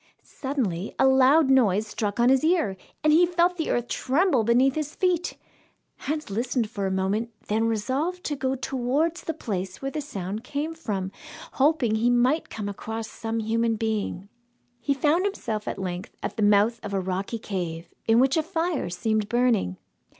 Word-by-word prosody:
Suddenly 220 - -3
a - - +4
loud 265 +2 +5
noise 215 -6 +4
struck 210 0 -3
on 240 +1 +5
his 265 +1 +4
ear, 320 - +2 0.3
and 305 0 +5
he 335 +3 +6
felt 350 +1 +2
the 320 - -2
earth 240 0 0
tremble 275 - +2
beneath 245 +4 +4
his 305 0 -4
feet. 360 -2 0 0.6
Hans 300 -4 -4
listened 235 +1 -1
for 200 -4 -2
a - - -2
moment, 195 +5 0 0.2
then 220 +2 +1
resolved 270 - -1
to 295 - -2
go 265 -1 -1
towards 270 +6 -1
the 325 - -2
place 190 -4 -4
where 270 0 -3
the 305 - -3
sound 210 -6 -5
came 295 +5 -3
from, 195 -12 -3 0.4
hoping 275 -5 +2
he 225 +2 +2
might 250 +6 +2
come 210 -2 -5
across 220 +2 -5
some 225 0 -3
human 225 +1 +1
being. 215 -3 -2 0.5
He 280 +2 0
found 305 +6 +2
himself 225 - -3
at - - -3
length 180 -1 -5
at - - -3
the - - -3
mouth 210 +3 +4
of 205 -1 -4
a - - +2
rocky 190 +4 -3
cave 175 -6 -4 0.2
in 225 +1 +5
which 270 +4 +3
a - - +4
fire 325 - -1
seemed 215 +4 -1
burning. 235 - +2
240 Hz, 180 wpm, -26 LUFS, 210-290 Hz, 0.6 s, he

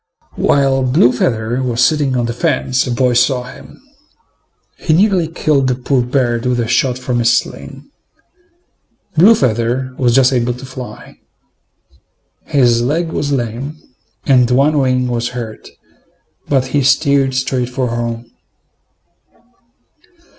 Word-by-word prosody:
While 135 -1 +2
Blue 130 0 +3
feather 120 0 -1
was 125 -1 +1
sitting 145 -4 0
on 120 - 0
the 115 - -3
fence, 130 -2 0
a - - -2
boy 125 +1 +1
saw 125 +1 +2
him. 125 - -13 1.0
He 160 - 0
nearly 185 -2 +2
killed 150 -4 0
the 125 - 0
poor 130 +1 0
bird 120 -1 -1
with 125 -1 0
a 115 - -1
shot 125 +2 +1
from 125 -1 -2
his 120 0 +3
sling. - - -7 1.3
Blue 195 +9 +6
feather 125 - -1
was 120 -3 +2
just 135 0 +4
able 120 -1 0
to 125 +2 -10
fly. 130 -1 -10 1.3
His 120 -4 +2
leg 160 +7 -1
was 145 -2 -2
lame, 130 +3 -3 0.5
and 125 -3 +3
one 140 +4 +2
wing 130 -1 +1
was 120 -1 -2
hurt, 115 -3 -7 0.8
but 135 -3 +2
he 145 - +2
steered 135 -1 +2
straight 130 -1 -1
for 125 -1 -2
home. 115 0 -4
130 Hz, 135 wpm, -15 LUFS, 120-140 Hz, 1.3 s, Blue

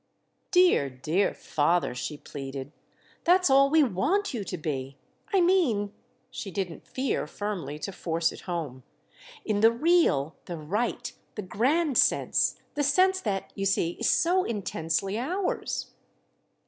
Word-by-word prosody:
"Dear, 360 - +4
dear 155 +10 0
father," 165 0 0
she 145 +4 -5
pleaded, 135 -1 -7 0.5
"that's 360 -3 +4
all 275 +1 +6
we 315 +1 +5
want 280 - 0
you 225 -5 -3
to 185 - -5
be! 135 -3 -4 0.3
I 390 -3 +4
mean"—she 235 - -1
didn't 185 -3 -5
fear 260 - -2
firmly 175 -6 -4
to 195 - -5
force 165 -2 -1
it - - -10
home—"in 175 - -6
the 225 +2 +6
real, 235 - +2
the 175 - -5
right, 200 +10 -2 0.2
the 210 - -4
grand 270 - +1
sense; - - +2
the 295 - -1
sense 370 +7 +3
that, 195 -3 -3
you 195 0 -1
see, 170 -3 +1
is - - +2
so 345 +9 +3
intensely 195 - -2
ours." 360 +10 -2
205 Hz, 135 wpm, -27 LUFS, -, 0.5 s, all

